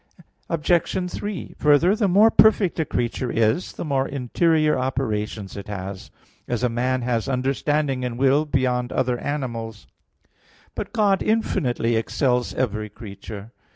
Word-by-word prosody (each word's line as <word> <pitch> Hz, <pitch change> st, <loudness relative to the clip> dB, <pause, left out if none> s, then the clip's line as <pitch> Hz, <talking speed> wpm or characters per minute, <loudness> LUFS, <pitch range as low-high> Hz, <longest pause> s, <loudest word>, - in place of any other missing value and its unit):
Obj. 175 Hz, +3 st, 0 dB
3: 205 Hz, -4 st, -5 dB
Further, 150 Hz, +6 st, +4 dB
the 215 Hz, -2 st, +1 dB
more 205 Hz, +5 st, +5 dB
perfect 210 Hz, -5 st, +4 dB
a 160 Hz, -, +1 dB
creature 120 Hz, -1 st, -2 dB
is, 115 Hz, +10 st, +1 dB
the -, -, -6 dB
more 135 Hz, -3 st, 0 dB
interior 155 Hz, +4 st, +1 dB
operations 110 Hz, -6 st, -2 dB
it 100 Hz, -, -8 dB
has; 95 Hz, -2 st, -6 dB, 0.4 s
as 120 Hz, 0 st, -2 dB
a 125 Hz, -, +3 dB
man 125 Hz, +2 st, -1 dB
has 120 Hz, +1 st, -1 dB
understanding 135 Hz, +1 st, 0 dB
and 120 Hz, -1 st, -3 dB
will 135 Hz, +3 st, +3 dB
beyond 125 Hz, -3 st, 0 dB
other 125 Hz, -1 st, 0 dB
animals. 115 Hz, -7 st, -4 dB, 0.9 s
But -, -, -5 dB
God 200 Hz, -3 st, +2 dB
infinitely 125 Hz, -, 0 dB
excels 125 Hz, +1 st, 0 dB
every 110 Hz, -4 st, -2 dB
creature. 105 Hz, 0 st, -10 dB
130 Hz, 135 wpm, -23 LUFS, 115-155 Hz, 0.9 s, more